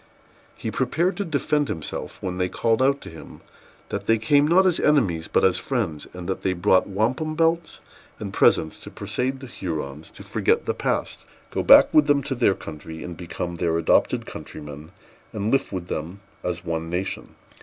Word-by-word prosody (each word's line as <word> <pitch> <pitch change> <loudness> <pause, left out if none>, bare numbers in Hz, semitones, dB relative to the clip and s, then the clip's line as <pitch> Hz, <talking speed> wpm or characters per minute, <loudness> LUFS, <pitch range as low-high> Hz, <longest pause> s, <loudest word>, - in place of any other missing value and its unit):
He - - -4
prepared 175 +4 0
to 200 - -1
defend 150 -2 0
himself, 80 - -6
when 90 -1 -3
they 90 0 +1
called 115 +4 +1
out 140 +1 +3
to - - -9
him, 80 - -12 0.5
that - - -4
they 115 - +4
came 145 +7 +3
not 185 +4 +5
as 180 -3 +3
enemies, 100 - +2
but - - +2
as 95 -1 +4
friends, 95 - -2
and 90 -1 -8
that 95 - -2
they 95 - +1
brought 95 +1 +3
wampum 125 +10 0
belts 165 +1 0 0.4
and - - -6
presents 80 - +3
to - - -10
persuade 125 +7 -3
the - - -7
Hurons 80 - -5
to - - -11
forget - - +1
the - - 0
past, - - -2 0.3
go - - -1
back - - +7
with 150 -1 +5
them 145 -1 +3
to 140 - -2
their 120 -6 +2
country, 80 +1 -8
become 85 0 -5
their 85 0 +1
adopted 85 - +2
countrymen, 75 +1 -9 0.4
and 105 +1 -1
live 135 0 +1
with 90 -3 -4
them 85 +6 -5 0.2
as 90 0 -3
one 80 -1 -3
nation. 90 +3 -4
95 Hz, 185 wpm, -24 LUFS, 85-140 Hz, 0.5 s, back